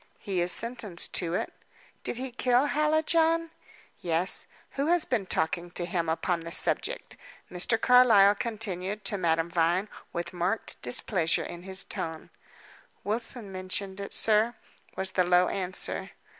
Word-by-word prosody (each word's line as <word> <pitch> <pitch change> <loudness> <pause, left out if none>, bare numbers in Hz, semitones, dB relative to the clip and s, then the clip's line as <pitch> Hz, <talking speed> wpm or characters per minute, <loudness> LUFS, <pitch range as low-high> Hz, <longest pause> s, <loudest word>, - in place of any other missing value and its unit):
"He 190 -3 -2
is 175 +1 +3
sentenced 225 -7 0
to 175 -1 0
it." - - -3 0.5
"Did - - -2
he 260 0 -5
kill 250 +2 +2
Hallijohn?" 320 +2 +2 0.5
"Yes. 170 +2 0 0.2
Who 280 +2 -2
has 345 0 +3
been 220 -7 -1
talking 170 +1 -1
to 175 - -2
him 170 -2 -2
upon 170 +2 0
the 165 0 -8
subject?" - - +1 0.3
Mr. 190 +5 +2
Carlyle 230 -6 +6
continued 210 -3 -3
to 200 0 0
Madame 165 -1 +1
Vine, 175 +4 +1 0.2
with 175 +1 -4
marked 180 +5 -1
displeasure 160 - +1
in 175 - -8
his 190 +1 -3
tone. 160 -1 -5 0.7
"Wilson 220 0 -2
mentioned 190 +1 -3
it, 200 - -6
sir," 220 +2 +2 0.4
was 190 0 -2
the 185 - +2
low 180 0 +4
answer. 185 -1 -3
190 Hz, 145 wpm, -28 LUFS, 175-235 Hz, 0.7 s, Carlyle